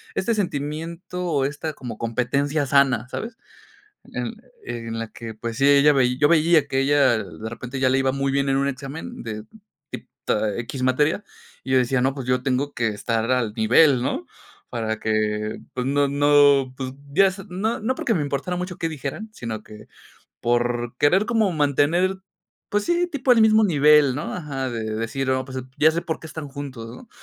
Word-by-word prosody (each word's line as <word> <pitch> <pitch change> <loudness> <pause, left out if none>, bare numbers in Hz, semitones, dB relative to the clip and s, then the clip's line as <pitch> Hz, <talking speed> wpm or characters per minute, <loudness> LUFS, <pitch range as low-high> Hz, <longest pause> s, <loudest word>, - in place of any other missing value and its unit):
este 230 +4 0
sentimiento 170 0 -3
o 150 -6 +1
esta 150 +2 -4
como 120 -5 -8
competencia 140 +6 0
sana, 135 -3 +3
¿sabes?, 225 - -6 0.8
en - - -3 0.3
en 115 -1 -5
la 115 - -4
que, 115 -1 -8
pues 115 +1 -5
sí, 135 +2 +3
ella 145 +1 +6
veí 125 -3 +2
yo 145 - +4
veía 160 -2 +4
que 135 - -1
ella 135 -4 +3
de 110 0 -7
repente 125 +3 -6
ya 130 - +4
le 130 +1 +2
iba 135 0 +1
muy 135 0 -1
bien 140 0 +1
en 135 - +2
un 140 +1 +1
examen 140 +1 -7
de 110 -1 -5 0.5
tip - - -8 0.2
eh, 105 +1 0
equis 130 +2 -6
materia, 150 +10 +1 0.4
y 130 - -3
yo 130 - +5
decía: 125 +1 +1
"No, 135 +2 +1
pues 135 -3 -6
yo 125 0 +1
tengo 135 +2 0
que 120 -3 0
estar 110 +2 -2
al 120 -4 0
nivel.", 125 +5 +5
¿no?, - - -2 0.4
para 110 -2 -3
que, 105 0 -1 0.2
pues 125 0 -2
no 140 +1 +2
no, 145 -2 +4
pues, 130 -1 -5 0.2
ya 195 +6 +5
s 190 +1 -3
no 205 +6 -2
no 250 +4 0
porque 230 - 0
me 155 - 0
importara 145 +5 -2
mucho 180 0 -4
qué 165 - -1
dijeran, 155 +8 -5
sino 110 - -6
que 105 0 -13 0.5
por 120 0 0
querer 185 +8 +4
como 225 -4 +2
mantener, 160 +5 +2 0.5
pues 205 0 0
sí, 345 +1 +1
tipo 275 -6 +2
el 230 - +4
mismo 220 0 +5
nivel, 150 -5 +5
¿no?, 145 - -4
ajá, 140 -6 -4
de 115 -2 -4
decir: 130 +4 -2
"Oh, 130 0 0
pues 130 -1 -6 0.2
ya 155 - +6
sé 170 +1 -2
por 160 -2 -4
qué - - -9
están 160 -1 -7
juntos", 135 -5 -7
¿no? 240 - -13
140 Hz, 195 wpm, -23 LUFS, 125-160 Hz, 0.8 s, ella